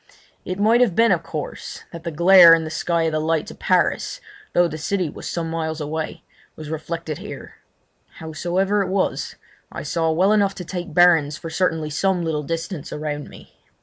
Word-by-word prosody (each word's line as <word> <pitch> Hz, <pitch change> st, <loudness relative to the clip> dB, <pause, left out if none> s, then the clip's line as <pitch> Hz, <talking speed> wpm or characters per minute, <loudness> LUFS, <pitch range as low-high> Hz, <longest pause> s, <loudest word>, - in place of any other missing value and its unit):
It 185 Hz, -, -4 dB
might 225 Hz, +4 st, +4 dB
have 220 Hz, -9 st, +3 dB
been, 230 Hz, 0 st, +4 dB
of -, -, +2 dB
course, -, -, -7 dB
that 170 Hz, -1 st, -9 dB
the 170 Hz, -, -3 dB
glare 170 Hz, +1 st, +8 dB
in 165 Hz, -, -2 dB
the 155 Hz, -, -6 dB
sky 170 Hz, +1 st, 0 dB
of 160 Hz, -, +1 dB
the 155 Hz, -, 0 dB
lights 160 Hz, 0 st, -1 dB
of -, -, -14 dB
Paris, -, -, +1 dB, 0.3 s
though 175 Hz, 0 st, +4 dB
the 155 Hz, -1 st, -6 dB
city 180 Hz, 0 st, -1 dB
was -, -, -7 dB
some 170 Hz, -1 st, -3 dB
miles 160 Hz, -1 st, -3 dB
away, 160 Hz, +2 st, -4 dB, 0.3 s
was 155 Hz, -1 st, -8 dB
reflected 160 Hz, -1 st, -5 dB
here. -, -, -9 dB, 0.6 s
Howsoever 175 Hz, +6 st, -1 dB
it 190 Hz, -, -2 dB
was, 190 Hz, 0 st, -1 dB, 0.4 s
I -, -, -6 dB
saw 165 Hz, -1 st, 0 dB
well 180 Hz, +6 st, +3 dB
enough 200 Hz, -2 st, +2 dB
to 180 Hz, -, -7 dB
take 175 Hz, -2 st, -6 dB
bearings 165 Hz, -5 st, +4 dB
for 165 Hz, -, -8 dB
certainly 160 Hz, -3 st, -1 dB
some 185 Hz, +3 st, 0 dB
little 155 Hz, -2 st, -1 dB
distance 165 Hz, +1 st, -5 dB
around 150 Hz, -1 st, -4 dB
me. -, -, -15 dB
165 Hz, 190 wpm, -22 LUFS, 160-185 Hz, 0.6 s, glare